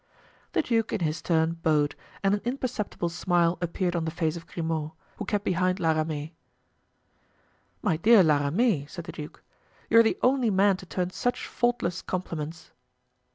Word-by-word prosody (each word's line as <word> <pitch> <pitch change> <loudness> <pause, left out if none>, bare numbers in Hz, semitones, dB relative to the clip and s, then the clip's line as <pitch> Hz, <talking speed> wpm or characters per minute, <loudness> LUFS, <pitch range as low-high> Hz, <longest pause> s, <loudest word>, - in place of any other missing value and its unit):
The - - +2
duke, 225 -4 0
in - - -1
his 155 -1 -1
turn, 165 0 +1
bowed, 150 -2 +2 0.3
and 195 0 +3
an 205 - 0
imperceptible 240 -7 -2
smile 170 0 +1
appeared 175 +1 -1
on 170 - 0
the 160 - -1
face 160 -1 -1
of 165 0 -9
Grimaud, 160 -2 -3 0.2
who - - -4
kept 205 0 -1
behind 185 +1 +1
La 165 -1 +2
Ramee. 155 0 -2 1.5
"My 180 -8 +2
dear 215 +3 +6
La 150 -3 +4
Ramee," 160 - +1
said 170 +2 -8
the - - -6
duke, 150 -1 -9 0.5
"you 230 - +8
are - - +8
the 220 - +1
only 255 -2 +3
man 195 0 +4
to 185 - -12
turn 180 +1 -2
such 245 +6 -2
faultless 240 -7 -1
compliments." 165 -3 -5
175 Hz, 170 wpm, -27 LUFS, 160-205 Hz, 1.5 s, you